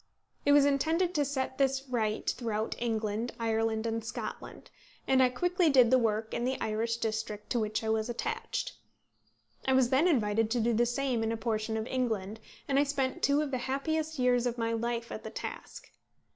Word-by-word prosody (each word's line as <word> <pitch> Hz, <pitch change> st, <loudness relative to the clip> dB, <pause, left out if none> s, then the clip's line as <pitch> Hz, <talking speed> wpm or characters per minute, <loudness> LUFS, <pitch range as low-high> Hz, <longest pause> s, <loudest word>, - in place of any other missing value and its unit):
It -, -, +6 dB
was 285 Hz, -1 st, +7 dB
intended 320 Hz, +6 st, +1 dB
to 295 Hz, -, +2 dB
set 265 Hz, -1 st, -3 dB
this 270 Hz, 0 st, +1 dB
right 220 Hz, -4 st, -1 dB
throughout 220 Hz, -2 st, -1 dB
England, 225 Hz, 0 st, -1 dB
Ireland, 225 Hz, 0 st, 0 dB
and 225 Hz, 0 st, -2 dB
Scotland; 225 Hz, -, -7 dB, 0.4 s
and 265 Hz, -1 st, +4 dB
I 255 Hz, -, +5 dB
quickly 355 Hz, +6 st, +1 dB
did 255 Hz, -4 st, +5 dB
the 260 Hz, -, +6 dB
work 220 Hz, -1 st, -1 dB
in 235 Hz, -, -1 dB
the 260 Hz, +1 st, -1 dB
Irish 225 Hz, +2 st, -1 dB
district 220 Hz, -2 st, -3 dB
to 240 Hz, -, +2 dB
which 215 Hz, 0 st, -1 dB
I 220 Hz, -, -1 dB
was 220 Hz, +1 st, 0 dB
attached. 240 Hz, -, -3 dB, 0.9 s
I 265 Hz, -, +4 dB
was 260 Hz, -2 st, +4 dB
then 275 Hz, +7 st, +4 dB
invited 225 Hz, -, +2 dB
to 240 Hz, +1 st, 0 dB
do 235 Hz, +1 st, +2 dB
the 240 Hz, +2 st, +3 dB
same 250 Hz, -1 st, 0 dB
in 225 Hz, 0 st, 0 dB
a 230 Hz, -, -2 dB
portion 220 Hz, -1 st, -1 dB
of 220 Hz, -, -2 dB
England, 220 Hz, -5 st, -2 dB, 0.3 s
and 275 Hz, 0 st, +2 dB
I -, -, +5 dB
spent 270 Hz, -2 st, -1 dB
two 285 Hz, +2 st, +3 dB
of 290 Hz, -, -4 dB
the 255 Hz, -, -1 dB
happiest 315 Hz, +3 st, -1 dB
years 250 Hz, -1 st, +2 dB
of 240 Hz, 0 st, -3 dB
my 230 Hz, -1 st, 0 dB
life 235 Hz, 0 st, -2 dB
at -, -, -6 dB
the -, -, -5 dB
task. -, -, -8 dB
240 Hz, 200 wpm, -30 LUFS, 220-270 Hz, 0.9 s, was